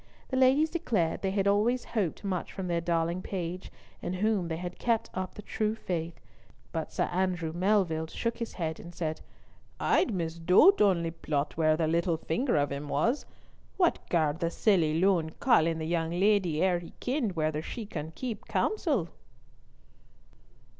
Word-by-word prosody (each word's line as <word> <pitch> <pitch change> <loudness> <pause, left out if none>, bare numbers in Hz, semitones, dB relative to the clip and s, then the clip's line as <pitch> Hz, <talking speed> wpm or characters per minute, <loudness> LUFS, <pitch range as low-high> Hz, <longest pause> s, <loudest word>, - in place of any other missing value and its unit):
The 260 - -2
ladies 265 +4 +4
declared 215 - 0
they 195 - 0
had 195 0 0
always 220 +5 +2
hoped 205 -7 -2
much 190 -3 -2
from 190 - -5
their 170 -1 0
darling 170 +1 0
page, 180 -1 -5 0.3
in 175 - -3
whom 200 -1 +1
they 160 -1 -3
had 180 +1 -6
kept 230 -1 0
up 185 0 -4
the 210 - -9
true 215 +1 -1
faith, 170 -5 -4 0.5
but 160 -1 -3
Sir - - 0
Andrew 180 -3 -1
Melville 175 -3 +1
shook 230 +7 -3
his 230 - -4
head 160 -3 -3
and 170 0 -11
said: 160 -2 -3 0.6
"I'd - - +2
misdoot 180 - +4
ony 175 -5 +3
plot 150 -3 -2
where 155 -1 +3
the 165 - +1
little 170 +1 +1
finger 235 - 0
of 145 -1 +1
him 140 +1 -4
was. 235 - 0 0.5
What 355 -3 +3
garred 160 -2 +1
the 170 -1 0
silly 170 -5 +2
loon 175 -4 +2
call 240 - +4
in 165 -1 0
the 160 - -3
young 165 0 0
leddy 180 -3 +2
ere 180 -2 +2
he 170 - -11
kenned 245 -7 -1
whether 155 -1 0
she 220 +6 -6
wad 160 0 -5
keep 240 -5 -5
counsel?" 285 - 0
175 Hz, 170 wpm, -29 LUFS, 165-210 Hz, 0.6 s, ladies